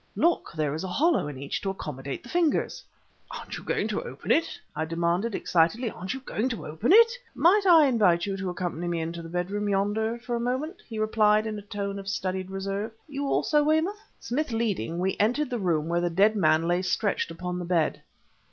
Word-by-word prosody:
"Look! 340 +1 +1
there 155 -3 -1
is 160 - -4
a - - -3
hollow 305 - +2
in 145 -3 -6
each 140 +1 -4
to 195 - -2
accommodate 140 -7 -5
the - - -12
fingers!" 340 -1 0 0.5
"Aren't - - -7
you - - -13
going - - -1
to - - -1
open - - -5
it?" 330 - +1 0.2
I 155 - -1
demanded 170 +6 0
excitedly 195 +8 +1
"aren't 185 +7 -5
you 265 - -7
going 255 -1 -2
to 230 - -5
open 160 - -1
it?" 460 +3 +8 0.2
"Might 390 +4 +4
I 325 -3 +8
invite 200 -10 +3
you 195 -1 -2
to 190 -1 -3
accompany 175 -1 -3
me 170 -1 -1
into 165 +1 -4
the 165 - -9
bedroom 195 +4 -2
yonder 205 +3 0
for 240 0 -4
a - - -1
moment?" 260 +9 -2
he 225 - -6
replied 215 0 +3
in 215 -1 -3
a - - -9
tome 200 -1 -4
of 195 - -9
studied 185 -1 -2
reserve. 195 +2 -3 0.2
"You 280 -1 -3
also, 295 +1 +2
Weymouth?" 320 +8 +1 0.2
Smith 280 +3 -2
leading, 205 - -1
we 185 +2 0
entered 250 +6 +1
the 240 - -1
room 165 -5 0
where 170 +1 +1
the 175 - +1
dead 200 +6 +3
man 160 -4 +3
lay 175 +1 +2
stretched 185 +1 0
upon 180 +2 -4
the 175 - -4
bed. 170 -3 +1
200 Hz, 215 wpm, -27 LUFS, 175-240 Hz, 0.5 s, it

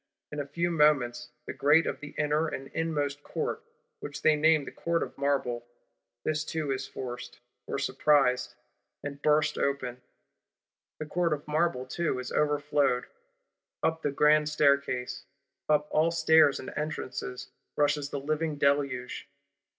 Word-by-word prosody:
In 145 -1 -3
few 170 +4 -1
moments, 145 -7 +2 0.2
the - - -5
Grate 150 +3 +4
of - - -3
the 150 0 -10
inner 150 +2 +1
and 135 -3 -6
inmost 145 -3 -1
Court, - - -3 0.4
which 145 - -7
they 155 - +5
name 155 -1 +4
Court 170 0 -1
of - - -8
Marble, 135 -4 0 0.6
this 155 0 0
too 155 -2 -3
is 135 0 -3
forced, 120 -1 -7 0.3
or - - -2
surprised, 135 -2 +2 0.5
and 145 0 -6
burst 150 0 +2
open: 130 -3 -1 1.0
the 155 - -5
Court 170 +1 0
of 150 0 -6
Marble 150 -4 0
too 155 +1 -1
is 125 - -5
overflowed: 145 -4 +1 0.8
up 160 0 +1
the 145 - 0
Grand 150 +2 +4
Staircase, 140 -4 +1 0.4
up 150 -1 +3
all 155 +2 +3
stairs 160 -3 +4
and - - -7
entrances 145 -4 -4 0.2
rushes 145 -1 +1
the 140 - -3
living 155 +2 -1
Deluge! 140 -3 0
145 Hz, 140 wpm, -29 LUFS, 135-155 Hz, 1.0 s, they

